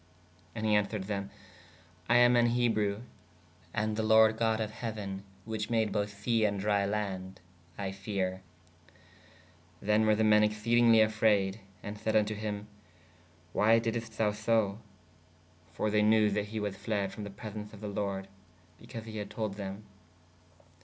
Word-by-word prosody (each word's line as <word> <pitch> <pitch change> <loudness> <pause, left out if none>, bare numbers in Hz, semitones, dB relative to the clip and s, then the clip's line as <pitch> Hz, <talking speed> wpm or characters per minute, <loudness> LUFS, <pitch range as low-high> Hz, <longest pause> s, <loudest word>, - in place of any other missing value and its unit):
¶ - - -30 0.5
And 110 -1 -3
he 110 - +3
answered 105 -1 +1
thē/ 100 0 -3 0.8
I 120 - +5
am 120 0 +6
an 120 0 +5
Ebrue: 115 -3 +1 0.4
& 85 0 -30
the 110 0 0
lord 110 0 +5
God 110 -1 +1
of 110 -1 -2
heuen 110 -4 -5 0.2
which 110 0 -3
made 110 -2 +1
both 105 -1 -1
se 115 +2 +1
and 100 -2 +1
drie 100 0 +1
land/ 95 -2 -3 0.4
I 100 -1 -3
feare. 95 -1 -3 1.4
Then 105 +3 +2
were 110 - +5
the 110 - +1
men 105 -1 +5
exceadingly 115 +2 +4
afrayd 105 -2 +2
& 95 - -29
sayd 105 +1 -3
vn 105 -1 +5
to 110 - -3
him/ 105 -1 -4 0.9
why 110 +2 +5
diddest 115 -1 -3
thou 105 -2 +2
so? 105 -1 0 0.9
For 105 +6 -1
they 105 0 +3
knew 105 0 +4
that 105 0 0
he 110 +1 -4
was 105 -2 -3
fled 100 -1 -2
from 105 - -7
the 100 - -6
presens 105 +1 -8
of 105 - -12
the 105 - -6
lorde/ 100 -1 -3 0.5
because 115 -2 -9
he 110 -1 -7
had 105 - -5
told 110 -3 -3
them. 100 +1 -7
105 Hz, 165 wpm, -31 LUFS, 100-110 Hz, 1.4 s, am